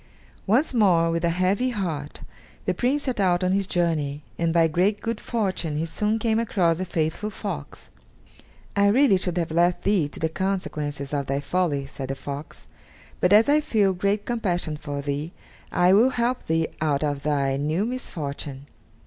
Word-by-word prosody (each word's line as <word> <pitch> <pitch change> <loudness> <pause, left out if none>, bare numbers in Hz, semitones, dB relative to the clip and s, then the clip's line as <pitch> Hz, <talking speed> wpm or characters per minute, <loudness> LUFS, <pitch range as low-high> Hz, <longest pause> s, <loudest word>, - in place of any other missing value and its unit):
Once 255 +9 +3
more, 175 -8 +4
with 165 0 -1
a 170 - +3
heavy 185 +8 +1
heart, 165 - -4 0.4
the - - +1
Prince 275 +4 0
set 255 -5 -2
out 180 -2 +2
on 185 - +2
his 195 0 +1
journey, 155 -5 -1
and 165 -1 0
by 165 0 +4
great 185 +6 +1
good 230 -1 -3
fortune 185 -8 -2
he 160 - -1
soon 210 +6 0
came 225 0 +1
across 180 -7 +1
the 185 - -2
faithful 165 +4 -2
fox. - - -7 0.8
"I 200 0 +4
really 250 +1 +5
should 180 -1 -1
have 165 -2 -1
left 175 +2 +2
thee 195 -7 +2
to - - -10
the 160 - +1
consequences 150 -6 -3
of 140 -1 -1
thy 135 +1 0
folly," 145 -3 0
said 135 -1 -7
the 135 - -3
fox; 140 +2 -8 0.5
"but 180 - +2
as 215 +2 +7
I 295 +1 +4
feel 210 -10 +2
great 200 +3 0
compassion 180 -9 -1
for 145 -1 -5
thee, 145 +4 -3 0.4
I 180 +1 +4
will 225 +6 +6
help 245 0 -1
thee 160 0 +1
out 150 -2 +1
of 145 -2 -1
thy 140 -2 0
new 155 +8 0
misfortune. 145 - -5
175 Hz, 180 wpm, -24 LUFS, 150-205 Hz, 0.8 s, as